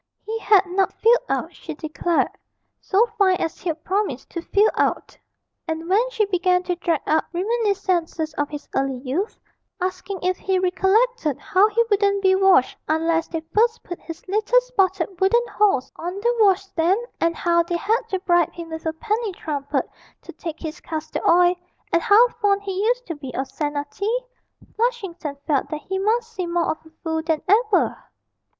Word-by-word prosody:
He 450 +1 -3
had 410 -3 +4
not 380 +1 0
filled 475 +2 +4
out, - - -2
she 320 - -8
declared, 320 +2 0 0.5
so 410 +4 +3
fine 380 -2 +5
as 330 -3 -3
he'd 325 -3 -4
promised 380 -9 -2
to 340 - -4
fill 410 +5 +3
out. - - -1 0.5
And 320 0 -3
when 430 +7 +2
she 455 -3 +1
began 365 -2 +1
to 360 -1 -1
drag 335 -3 0
up 315 +1 +2
reminiscences 370 -5 -1
of 290 -2 -2
his 295 -1 -8
early 270 -1 0
youth, 280 - -3 0.4
asking 370 +1 -4
if 370 0 +1
he 380 -1 0
recollected 380 - +1
how 400 +3 +3
he 460 +2 +2
wouldn't 400 -1 +2
be 380 0 +5
washed 380 -8 +4
unless 325 +1 +1
they 325 -1 -4
first 455 +2 +2
put 350 - -7
his 330 +1 -10
little 430 +5 +3
spotted 385 -7 -1
wooden 475 +5 +3
horse 385 -12 +1
on 350 +2 -4
the 475 +4 0
washstand, 385 -2 +3 0.2
and 335 0 +1
how 340 0 +2
they 345 +1 -2
had 440 +6 +1
to 380 - 0
bribe 345 -3 +2
him 335 -1 -8
with 320 0 -5
a 320 - 0
penny 430 +4 -2
trumpet 285 -5 -3 0.4
to - - -10
take 330 -2 -7
his 315 0 -6
castor 315 -1 -5
oil, 355 +1 +5 0.4
and 335 - +4
how 430 +7 +6
fond 400 -1 +2
he 390 0 -2
used - - +1
to 335 - -4
be 285 -4 -8
of 265 - -1
senna 290 -1 -3
tea, 460 +5 -1 0.5
Flushington 390 - -2
felt 285 -3 0
that 305 -1 -4
he 380 +5 -3
must 455 +3 0
seem 365 -5 -3
more 345 -1 +1
of 315 - -7
a - - -16
fool 320 -1 -1
than 315 -1 -1
ever! 425 -1 +2
370 Hz, 180 wpm, -22 LUFS, 325-415 Hz, 0.5 s, how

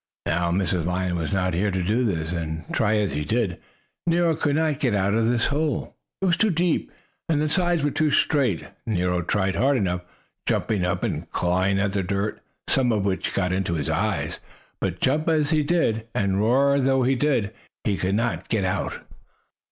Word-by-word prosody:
Now 85 +2 +1
Mrs. 90 -2 0
Lion 90 0 -1
was 85 -2 -2
not 95 -2 0
here 95 +5 +1
to 95 -2 -1
do 110 +7 +1
this, 85 -7 -1
and, 80 -2 -3
try 110 -1 +2
as 105 -2 0
he 75 +1 -2
did, 100 +1 -1 0.5
Nero 170 -1 +3
could 145 -2 0
not 155 -3 +1
get 125 -8 +1
out 100 0 +1
of 115 +1 +2
this 120 -1 +2
hole. 150 0 -1 0.3
It - - +3
was 175 -2 +3
too 220 - +3
deep, 175 -1 0 0.4
and 155 -3 +2
the 155 - +1
sides 175 -1 +1
were 145 - +1
too 155 +2 +1
straight. 135 - +2 0.2
Nero 90 -4 0
tried 95 +2 0
hard 135 +1 +3
enough, 90 -5 0 0.5
jumping 105 -5 0
up 90 0 -1
and - - -2
clawing 95 +2 +1
at 100 0 0
the 100 - +1
dirt, 100 +3 -2 0.3
some 130 -3 +2
of 105 -3 0
which 95 -2 -1
got 90 -2 +1
into 95 -2 -1
his 75 -4 -2
eyes, - - -1 0.4
but - - -3
jump 150 +5 +1
though 160 -2 +3
he 155 +1 +2
did, 145 -9 +1
and 100 -1 +1
roar 135 +6 +3
though 135 -1 +2
he 130 +2 +3
did, 125 -6 +1 0.3
he 105 - +1
could 95 +1 0
not 115 +2 -1
get 105 -4 +1
out. 90 - -2
105 Hz, 200 wpm, -24 LUFS, 95-140 Hz, 0.5 s, Nero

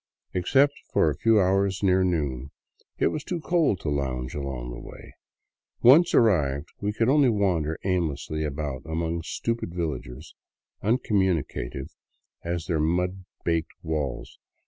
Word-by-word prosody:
Except 135 +11 +3 0.2
for 80 - +3
a - - -4
few 115 -1 +4
hours 95 +1 +1
near 95 -1 +4
noon, 70 -7 -1 0.5
it - - +3
was 155 - -4
too 175 +2 -3
cold 160 - +1
to 75 - -2
lounge 65 -3 -2
along 65 -4 -4
the - - -7
way; - - -12 0.7
once 150 +8 +7
arrived 75 - +3
we 105 0 0
could 115 +2 0
only 140 -1 +5
wander 90 -8 +1
aimlessly 80 -4 -1
about 70 -3 -3
among 80 +1 -2
stupid 115 +1 -3
villagers, 75 -3 -5 0.5
uncommunicative 95 - 0 0.5
as 85 -1 -3
their 80 -2 0
baked 90 +4 -2
mud 85 -1 +1 0.2
walls. 75 -5 -3
85 Hz, 135 wpm, -26 LUFS, 75-100 Hz, 0.7 s, once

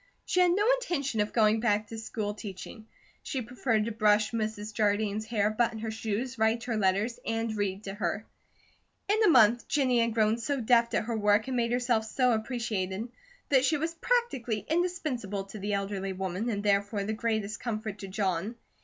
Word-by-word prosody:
She 365 - +1
had 360 -1 +5
no 410 +4 +2 0.2
intention 280 - -2
of 210 0 +1
going 220 -1 +3
back 210 -2 +1
to 225 - -6
school 215 -2 -3
teaching. 210 +2 -9 0.3
She 265 -4 -3
preferred 230 -2 0
to 230 - -2
brush 215 -1 +3
Mrs. 215 -2 -3
Jardine's 210 0 0
hair, 215 -2 +1
button 230 +1 0
her 220 0 -4
shoes, 225 +3 -3
write 220 +1 +2
her 235 -2 -2
letters, 210 +4 +1
and 225 -1 -2
read 200 -1 -2
to 195 - -5
her. 210 +1 -2 0.8
In 430 +2 +2
a - - +5
month, 240 -5 +5
Jennie 255 -4 +2
had 230 -1 0
grown 220 +1 +2
so 280 +4 -1
deft 235 0 +3
at - - +1
her 230 0 -2
work 210 +1 +2
and 260 - -2
made 235 -1 +1
herself 240 -2 +1
so 250 +3 +2
appreciated, 220 -3 -2 0.4
that 265 -2 +4
she 305 +3 +2
was 325 +3 -2
practically 330 - -1
indispensable 305 - -1
to 195 +2 -10
the 205 +1 -2
elderly 195 -1 -2
woman, 190 +4 -3
and 205 -3 -2
therefore 200 0 +1
the 215 +2 -2
greatest 220 -2 -2
comfort 215 -3 -4
to 195 - -6
John. 195 +2 -1
220 Hz, 190 wpm, -29 LUFS, 205-240 Hz, 0.8 s, had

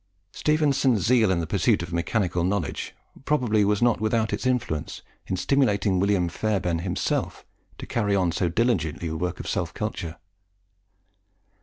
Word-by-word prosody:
Stephenson's 140 -7 +2
zeal 115 -3 +4
in 90 -2 +1
the - - -2
pursuit 85 - +1
of 85 0 -7
mechanical 90 0 0
knowledge 95 -4 -2 0.3
probably 120 -8 +2
was 105 +2 +1
not 120 -2 +2
without 110 0 +1
its 105 - -1
influence 115 -12 -2 0.2
in 95 - -2
stimulating 100 -4 +2
William 95 -2 +2
Fairbairn 90 -2 -1
himself 90 +1 -2 0.3
to - - -7
carry 105 -4 0
on 90 -3 +2
so 90 +1 0
diligently 85 -6 0
the 80 - -4
work 90 +1 -3
of - - -6
self - - -2
culture. 85 0 -4
100 Hz, 150 wpm, -25 LUFS, 85-115 Hz, 0.3 s, zeal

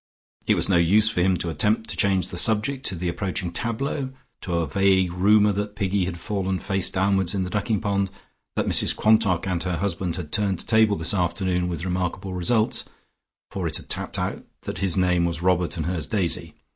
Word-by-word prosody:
It - - +4
was - - +1
no 95 - +3
use 105 +6 +4
for 90 - 0
him 90 0 +3
to 85 - -2
attempt 105 +8 0
to - - -4
change 95 -2 +1
the 90 - -6
subject 115 +7 0
to 95 - -2
the 90 +1 -3
approaching 85 0 -3
tableaux, 130 +4 -2 0.3
to 90 - -3
a 85 -1 +1
vague 95 +2 +2
rumour 105 +3 +4
that 105 +1 -3
Piggy 100 -2 0
had 90 -1 -5
fallen 95 -1 -2
face 95 0 0
downwards 95 -1 +1
in 95 - 0
the 90 - -5
ducking 105 0 0
pond, 100 -2 0 0.5
that - - 0
Mrs - - +3
Quantock 110 -5 +3
and 90 -3 -1
her 90 -1 -2
husband 90 -1 -1
had 85 -5 -7
turned 100 -4 0
a - - -6
table 110 -2 +4
this 80 0 -1
afternoon 90 -1 0
with 85 -1 -4
remarkable 90 +1 -2
results, 110 +5 +1 0.7
for - - -2
it - - -2
had - - -12
tapped - - -2
out - - -3 0.2
that - - -5
his 95 -2 +2
name 90 -1 +3
was 85 0 -2
Robert 90 -3 +1
and 80 - -2
hers 90 -2 -2
Daisy. 90 -5 -1
95 Hz, 210 wpm, -24 LUFS, 90-105 Hz, 0.7 s, It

